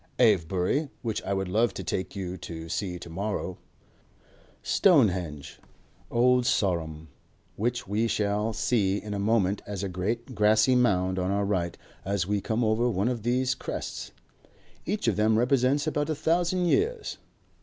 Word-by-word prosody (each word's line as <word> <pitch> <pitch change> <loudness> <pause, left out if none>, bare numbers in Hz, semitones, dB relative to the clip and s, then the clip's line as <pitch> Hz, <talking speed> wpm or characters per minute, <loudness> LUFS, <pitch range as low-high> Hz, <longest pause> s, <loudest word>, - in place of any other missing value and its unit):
Avebury, 100 - +2
which 115 -3 -2
I 100 - -2
would 95 -1 -2
love 110 +6 +1
to - - -5
take 95 - -3
you 90 -2 -4
to 80 -2 -8
see 90 0 -2
to 85 - -10
morrow. 95 0 -3 1.0
Stonehenge. 95 - +2 0.5
Old 125 +1 +3
Sarum, 80 -9 0 0.5
which 120 +2 -2
we 105 +4 +1
shall 105 0 0
see 105 -4 +1
in 105 -1 -6
a 100 - -2
moment 100 -2 +1
as 100 -1 -4
a 100 - -2
great 110 +8 -3
grassy 110 +3 +4
mound 95 -6 +2
on 90 0 -1
our 100 +1 +1
right 90 -4 -1 0.3
as 100 -2 -1
we 100 +1 0
come 110 +4 -1
over 110 +2 +2
one 100 +1 0
of 120 -3 -2
these 125 +3 +1
crests. 130 - -6 0.8
Each 205 +4 -1
of - - +2
them 110 +1 +3
represents 130 +4 +2
about 150 -1 -1
a 155 - 0
thousand 175 +4 +1
years. 440 - 0
105 Hz, 155 wpm, -27 LUFS, 95-125 Hz, 1.0 s, grassy